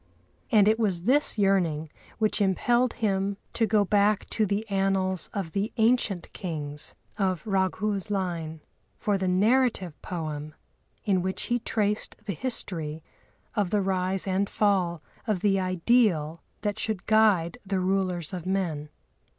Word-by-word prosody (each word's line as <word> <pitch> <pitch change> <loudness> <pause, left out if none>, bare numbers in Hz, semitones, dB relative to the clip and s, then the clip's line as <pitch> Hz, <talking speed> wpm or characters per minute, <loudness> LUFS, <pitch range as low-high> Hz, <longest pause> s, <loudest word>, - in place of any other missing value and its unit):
And 210 -3 +6
it 220 +1 +3
was 190 -6 0
this 265 +3 +3
yearning 175 -7 +1 0.3
which 215 -1 +1
impelled 240 +6 +2
him 200 -3 0 0.2
to 225 - +1
go 210 -1 +3
back 205 +1 +2
to 215 -2 +2
the 205 +3 -1
annals 195 -3 0
of 190 -5 -4
the 200 +5 -1
ancient 220 -5 +1
Kings 150 -5 -4 0.2
of 185 -5 0
Raghu's 195 0 0
line 170 -5 -3 0.4
for 205 - 0
the 190 - -1
narrative 200 - +2
poem, 155 -3 -5 0.5
in 190 -4 +2
which 190 +1 -1
he 240 0 0
traced 210 -2 -1
the 200 - -2
history 160 - -2 0.5
of 205 -3 0
the 205 +1 +1
rise 190 0 0
and 195 +1 0
fall 185 -6 +1 0.2
of 205 -5 0
the 195 -2 +3
ideal 185 -4 +2 0.2
that 205 0 -2
should 215 -5 -2
guide 215 -3 +3
the 195 -1 -1
rulers 185 -2 -1
of 180 -1 -5
men. 170 -6 -1
195 Hz, 140 wpm, -27 LUFS, 175-210 Hz, 0.5 s, And